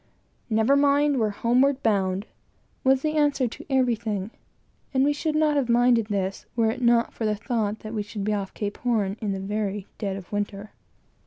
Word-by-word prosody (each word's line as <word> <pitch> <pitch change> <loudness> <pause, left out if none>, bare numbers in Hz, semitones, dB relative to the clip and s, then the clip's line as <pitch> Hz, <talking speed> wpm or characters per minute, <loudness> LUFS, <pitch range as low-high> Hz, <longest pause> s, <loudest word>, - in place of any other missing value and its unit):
"Never 220 +5 +3
mind 285 0 +3
we're 220 -2 +2
homeward 255 +6 +2
bound!" 195 -2 +1 0.6
was 265 0 +3
the 310 0 0
answer 290 -3 +2
to 230 - -9
everything; 230 -6 0 0.6
and 260 - +4
we 290 +1 +3
should 305 +1 -2
not 305 -1 +3
have 260 -4 0
minded 235 -2 +4
this, 195 -2 -3
were 225 -2 +2
it 250 +2 -6
not 235 -1 +3
for - - -5
the 210 - +1
thought 220 -1 -2
that 215 +1 -7
we 215 - -1
should 205 0 -6
be 215 +1 0
off 195 -2 -3
Cape 205 -1 -4
Horn 215 -5 0
in 210 -2 -1
the 195 - -3
very 205 0 -3
dead 200 -3 -2
of 190 -2 -9
winter. 205 0 -3
225 Hz, 190 wpm, -25 LUFS, 205-260 Hz, 0.6 s, and